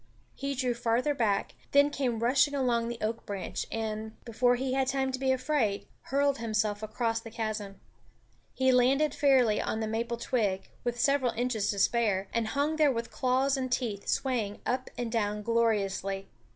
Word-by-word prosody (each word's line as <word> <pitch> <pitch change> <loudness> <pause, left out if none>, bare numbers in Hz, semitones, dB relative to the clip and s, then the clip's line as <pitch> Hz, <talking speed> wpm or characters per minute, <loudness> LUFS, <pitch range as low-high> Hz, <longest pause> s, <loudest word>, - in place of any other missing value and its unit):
He 275 0 -3
drew 250 -1 0
farther 240 +4 +1
back, 220 -7 0 0.2
then 285 +1 +5
came 245 -5 -1
rushing 280 +4 +3
along 240 -4 +1
the 235 0 -4
oak 225 +2 -2
branch 200 -3 -4
and, 220 0 -4
before 245 +1 +2
he 260 +1 -2
had 265 0 +1
time 265 0 0
to 260 - -3
be 265 0 +2
afraid, 255 -6 0 0.2
hurled 280 0 +1
himself 215 -2 -1
across 225 +1 -1
the 225 - -10
chasm. 215 -3 -4 0.7
He 260 0 +2
landed 265 +4 +3
fairly 255 -7 +3
on 220 - -2
the 220 - -1
maple 230 +2 -2
twig, 210 -5 -1
with 240 0 -2
several 275 -2 +2
inches 230 -3 -1
to 200 - -1
spare, 200 -2 +2
and 230 -1 0
hung 290 +6 0
there 300 -3 +4
with 230 -2 -4
claws 260 +2 +1
and 260 -2 -3
teeth, 225 -5 -2
swaying 230 -6 -1
up 255 +1 -1
and 240 -2 -3
down 210 -2 -1
gloriously. 200 -4 0
235 Hz, 175 wpm, -29 LUFS, 220-260 Hz, 0.7 s, then